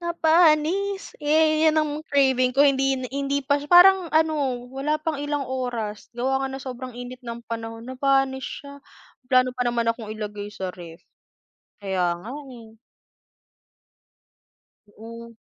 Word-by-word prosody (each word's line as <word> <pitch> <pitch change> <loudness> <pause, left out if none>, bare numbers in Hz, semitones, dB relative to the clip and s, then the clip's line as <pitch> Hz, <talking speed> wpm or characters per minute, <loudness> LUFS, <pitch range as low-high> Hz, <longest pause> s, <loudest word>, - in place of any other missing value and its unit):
Napanis, 340 +3 +2
eh, 310 +1 +3
yan 315 0 +3
ang 305 0 -3
craving 265 -4 +2
ko - - +4
hindin 270 -1 +2
hindi 280 0 -1
pa 285 +1 +2
sy - - -8
parang 360 +1 +7
ano, 295 -6 +1
wala 285 +3 -1
pang 315 -1 -2
ilang 290 -1 -2
oras. 240 -5 -4
Gawa 265 +3 -1
nga - - -2
ng 270 - -6
sobrang 255 -1 -7
init 250 +1 -8
ng 235 0 -6
panahon, 225 0 -6
napanis 265 +1 0 0.2
siya. 280 0 -11 0.5
May - - -33
plano 255 0 +4
pa 250 - -1
naman 235 -1 0
akong 230 -2 -3
ilagay 210 -1 -6
sa 190 -2 -5
ref. 170 -2 -12 0.8
Kaya 180 -4 -1
nga, 220 +8 -9 0.2
eh. 225 -3 -13 2.1
Oo. 230 +2 -11
265 Hz, 145 wpm, -24 LUFS, 230-300 Hz, 2.1 s, parang